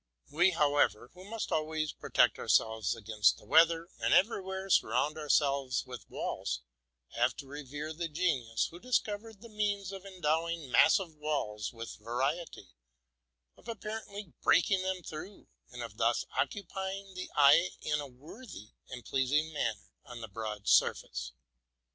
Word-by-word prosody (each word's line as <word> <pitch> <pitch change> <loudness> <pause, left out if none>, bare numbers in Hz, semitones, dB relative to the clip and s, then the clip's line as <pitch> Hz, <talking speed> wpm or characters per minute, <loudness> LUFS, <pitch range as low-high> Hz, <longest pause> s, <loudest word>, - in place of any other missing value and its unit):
We, 175 +5 +5
however, 145 - +2
who 185 +1 -13
must 225 +2 -4
always 155 0 0
protect - - +2
our - - -6
selyes 110 -2 +2
against 110 -2 +2
the - - -17
weather, 165 +6 +5
and - - +3
everywhere 190 -2 +1
surround 135 +5 +3
our 150 -2 -7
selves 140 -3 +2
with 125 -5 -10
walls, 60 0 -3 0.5
have - - +1
to - - -7
revere 145 +2 -6
the 170 +1 -3
genius 145 -9 0
who 170 - -10
discovered 220 -2 -2
the 235 - -10
means 205 -2 -1
of 195 -1 -8
endowing 165 -5 -1
massive 180 - +5
walls 145 -9 -2
with 115 -1 -8
variety, 130 - -3 0.9
of - - -21
appar 220 -1 -5
ently 200 -4 -9
breaking 185 +2 +4
them 185 -1 -2
through, 160 +7 -9 0.2
and - - -7
of - - -9
thus - - +2
occupying 195 -1 -3
the 185 0 -6
eye 145 +5 +6
in 150 0 0
a 145 - -6
worthy 135 - -12 0.2
and 125 -2 -8
pleasing 145 +4 +1
manner 110 -8 -2
on 120 -4 -9
the 115 - -6
broad 105 0 -6
surface. 60 0 +2
155 Hz, 150 wpm, -31 LUFS, 125-190 Hz, 0.9 s, eye